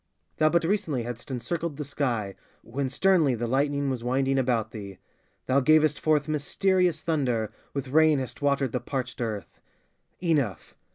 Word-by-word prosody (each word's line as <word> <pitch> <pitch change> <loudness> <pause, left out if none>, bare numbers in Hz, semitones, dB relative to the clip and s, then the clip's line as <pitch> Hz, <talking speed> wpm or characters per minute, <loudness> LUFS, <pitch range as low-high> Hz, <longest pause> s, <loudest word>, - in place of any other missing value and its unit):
Thou 155 - +4
but 170 +1 +2
recently 165 - 0
had'st 120 +1 -7
encircled 155 +4 -3
the 150 - -4
sky 120 -8 -2 0.3
When 130 +3 -3
sternly 160 -3 +3
the 120 +1 -3
lightning 140 +2 +1
was 125 -3 -4
winding 135 +2 +1
about 120 -4 0
thee; 100 -5 -8 0.5
Thou 130 +2 +3
gavest 155 +1 +4
forth 150 -1 +2
mysterious 175 +3 +1
thunder, 125 -9 0 0.2
With 135 -2 -3
rain 155 +1 +5
hast 130 +1 -5
watered 140 -3 +1
the 125 - -1
parched 130 -2 -4
earth. 105 -6 -5 0.6
Enough! 145 - -1
140 Hz, 155 wpm, -27 LUFS, 120-155 Hz, 0.6 s, rain